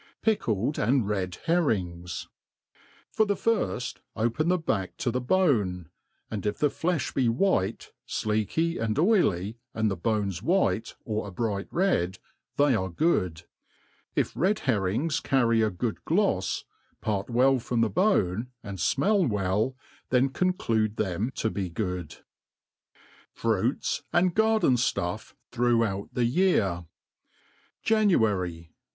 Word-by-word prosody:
Pickled 140 Hz, -, 0 dB
and 120 Hz, 0 st, +2 dB
Rid 95 Hz, -4 st, -2 dB
Herrings. 90 Hz, -, -1 dB, 0.8 s
For 220 Hz, -, +3 dB
the 200 Hz, -, +1 dB
firft, 215 Hz, -, -1 dB, 0.2 s
open 120 Hz, +8 st, 0 dB
the 180 Hz, +1 st, +3 dB
back 100 Hz, -, -2 dB
to 120 Hz, -, -1 dB
the 125 Hz, +2 st, -1 dB
bone, 115 Hz, -, +1 dB, 0.4 s
and 105 Hz, -4 st, -3 dB
if 105 Hz, 0 st, -1 dB
the 150 Hz, -, +2 dB
flefh 175 Hz, -2 st, -1 dB
be 130 Hz, -4 st, +2 dB
white, 115 Hz, -, 0 dB, 0.2 s
fleaky 110 Hz, +11 st, -1 dB
and 110 Hz, 0 st, -1 dB
oily, 120 Hz, -, +2 dB, 0.2 s
and 110 Hz, -2 st, +1 dB
the -, -, -1 dB
bone 105 Hz, +2 st, 0 dB
white, 135 Hz, -, +1 dB
or 110 Hz, -1 st, -2 dB
a -, -, -7 dB
bright 100 Hz, 0 st, -2 dB
red, 95 Hz, -, +1 dB, 0.4 s
they 145 Hz, -1 st, +4 dB
are 95 Hz, -4 st, 0 dB
good. 90 Hz, -, 0 dB, 0.7 s
If -, -, +1 dB
red 190 Hz, +5 st, +1 dB
herrings 130 Hz, -, 0 dB
carry 115 Hz, -4 st, +2 dB
a 110 Hz, -, +3 dB
good 105 Hz, +4 st, -4 dB
glofs, 160 Hz, -, +1 dB, 0.4 s
part 100 Hz, -1 st, -2 dB
well 130 Hz, +2 st, +4 dB
from 120 Hz, 0 st, -1 dB
the 115 Hz, -, +2 dB
bone, 115 Hz, -, +2 dB, 0.2 s
and 100 Hz, -3 st, -7 dB
fmell 195 Hz, -, +2 dB
well, 105 Hz, +5 st, 0 dB, 0.3 s
then 130 Hz, +1 st, +3 dB
conclude 115 Hz, -, 0 dB
them 100 Hz, +5 st, -1 dB
to 110 Hz, -, -1 dB
be 95 Hz, -3 st, -3 dB
good, 90 Hz, -3 st, -4 dB, 1.2 s
FRUITS 115 Hz, +3 st, 0 dB
and 175 Hz, 0 st, +3 dB
GARDEN 220 Hz, -, +3 dB
STUFF 120 Hz, -, -2 dB, 0.2 s
throughout 115 Hz, -5 st, +1 dB
the 125 Hz, -, 0 dB
Year. 115 Hz, -, +2 dB, 1.0 s
January. 105 Hz, -, +1 dB
115 Hz, 130 wpm, -27 LUFS, 100-155 Hz, 1.2 s, they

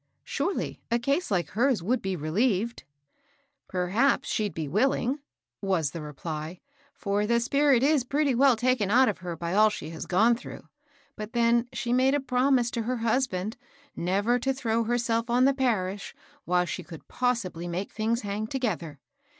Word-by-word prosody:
^^ -, -, -49 dB, 0.2 s
Surely 345 Hz, +8 st, -3 dB
a 235 Hz, -, +2 dB
case 275 Hz, +9 st, 0 dB
like 175 Hz, -7 st, 0 dB
hers 230 Hz, -, +1 dB
would 245 Hz, +7 st, 0 dB
be 190 Hz, -1 st, -2 dB
relieved? 200 Hz, -, 0 dB, 0.3 s
" 280 Hz, 0 st, -39 dB
" 280 Hz, 0 st, -49 dB
Perhaps 200 Hz, +10 st, +2 dB
she'd 210 Hz, -2 st, 0 dB
be 160 Hz, -2 st, -3 dB
willing, 255 Hz, -, +1 dB, 0.4 s
was 180 Hz, -8 st, 0 dB
the 165 Hz, -, -6 dB
reply; 155 Hz, +3 st, -6 dB, 0.4 s
for 205 Hz, +1 st, -1 dB
the 235 Hz, +1 st, +3 dB
spirit 275 Hz, +1 st, +3 dB
is 290 Hz, -2 st, +3 dB
pretty 280 Hz, +2 st, +1 dB
weU 260 Hz, 0 st, +4 dB
taken 245 Hz, -4 st, +1 dB
out 255 Hz, +4 st, +5 dB
of 210 Hz, -, -1 dB
her 175 Hz, -2 st, -5 dB
by 170 Hz, +1 st, -4 dB
all 215 Hz, +2 st, +6 dB
she 165 Hz, -6 st, -6 dB
has 160 Hz, -, -7 dB
gone 220 Hz, +6 st, +4 dB
through; 235 Hz, -, -10 dB, 0.5 s
but 215 Hz, +1 st, -7 dB
then 235 Hz, 0 st, +3 dB
she 245 Hz, -1 st, -2 dB
made 260 Hz, +2 st, +3 dB
a -, -, +2 dB
promise 250 Hz, -2 st, +2 dB
to 235 Hz, -, -2 dB
her 250 Hz, +3 st, -2 dB
husband 225 Hz, -3 st, -1 dB, 0.4 s
never 200 Hz, +8 st, +1 dB
to 270 Hz, +2 st, -1 dB
throw 230 Hz, -3 st, 0 dB
herself 235 Hz, 0 st, 0 dB
on 245 Hz, +2 st, +4 dB
the 275 Hz, -, +4 dB
parish 205 Hz, -8 st, -1 dB, 0.3 s
while 180 Hz, 0 st, +2 dB
she 185 Hz, -, -4 dB
could 165 Hz, -2 st, -12 dB
possibly 230 Hz, -9 st, -1 dB
make 180 Hz, +3 st, -4 dB
things 225 Hz, +2 st, -1 dB
hang 205 Hz, +1 st, -3 dB
together. 190 Hz, -, -3 dB
230 Hz, 180 wpm, -27 LUFS, 185-255 Hz, 0.5 s, all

